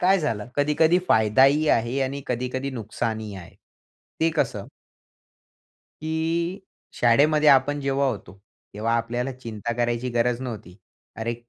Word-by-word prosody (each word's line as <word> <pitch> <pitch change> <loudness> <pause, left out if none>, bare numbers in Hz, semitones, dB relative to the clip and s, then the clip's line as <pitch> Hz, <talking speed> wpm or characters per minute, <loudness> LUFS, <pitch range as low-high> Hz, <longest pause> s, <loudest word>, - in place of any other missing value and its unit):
काय 190 +2 +4
झालं 115 -7 -2
कधी-कधी, 155 +4 +3
फायदाही 135 +8 +4
आहे 120 +4 +1
आणि 140 +1 -3
कधी-कधी 125 +2 -3
नुकसानही 110 -2 -4
आहे, 85 -3 -12 0.7
ते 165 - +3
कसं? 110 -8 -1 1.3
की 165 +4 -2 0.4
शाळेमध्ये 150 +6 +4
आपण 140 +2 +4
जेव्हा 140 0 0
होतो, 100 -7 -5 0.4
तेव्हा 110 +3 -1
आपल्याला 120 +3 -2
चिंता 120 -2 -5
करायची 120 +1 -1
गरज 120 +1 0
नव्हती. 110 -7 -7 0.4
"अरे 115 +1 -2
125 Hz, 120 wpm, -24 LUFS, 115-145 Hz, 1.3 s, काय